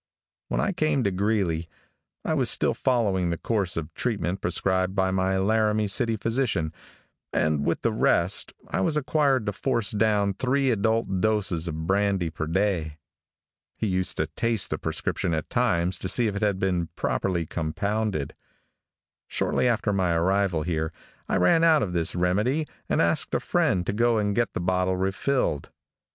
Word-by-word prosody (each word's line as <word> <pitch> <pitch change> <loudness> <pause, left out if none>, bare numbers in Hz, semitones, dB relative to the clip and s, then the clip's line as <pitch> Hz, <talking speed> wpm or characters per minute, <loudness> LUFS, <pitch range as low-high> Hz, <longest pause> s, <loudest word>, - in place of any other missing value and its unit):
When - - -1
I - - +1
came 155 -7 +1
to 100 - +1
Greeley, 95 -4 0 0.6
I - - 0
was - - +1
still - - +2
following 100 -9 +1
the 85 - -1
course 100 -5 -1
of 80 -1 -4
treatment 100 -5 -2
prescribed 95 +2 0
by 95 -1 +1
my 95 0 +1
Laramie 105 +1 +2
City 115 +3 +1
physician, 115 -9 -1 0.6
and 75 -2 +1
with 85 - -1
the 115 - +2
rest, 90 -3 +2 0.2
I - - -1
was 150 +10 +1
required 140 -4 +1
to 105 - -1
force 115 -1 -1
down 105 -2 +2
three 130 +4 +1
adult 110 -3 0
doses 100 -6 +1
of 80 0 -4
brandy 95 -2 +1
per 80 0 -4
day. 85 -4 0 0.8
He - - -2
used 95 -2 -1
to 75 - +1
taste 110 +7 -1
the - - -2
prescription 85 - -1
at 80 - -5
times 85 +1 +1
to 95 - -3
see 120 - +4
if 105 -2 -1
it 100 - -3
had 105 -3 +1
been 90 -3 0
properly 90 -4 -1
compounded. 90 +1 -2 0.9
Shortly - - 0
after 115 -3 +1
my 90 -3 +1
arrival 90 -1 +1
here 80 -2 -2 0.4
I - - +1
ran 90 - +4
out 160 -2 +5
of 90 -4 -3
this 85 -1 -1
remedy 105 - +1 0.2
and - - +2
asked - - 0
a - - +2
friend 90 -1 +1
to - - -1
go 115 +1 +2
and 105 -1 0
get 120 0 0
the - - -3
bottle 90 +1 +1
refilled. 95 - -1
95 Hz, 170 wpm, -26 LUFS, 85-110 Hz, 0.9 s, out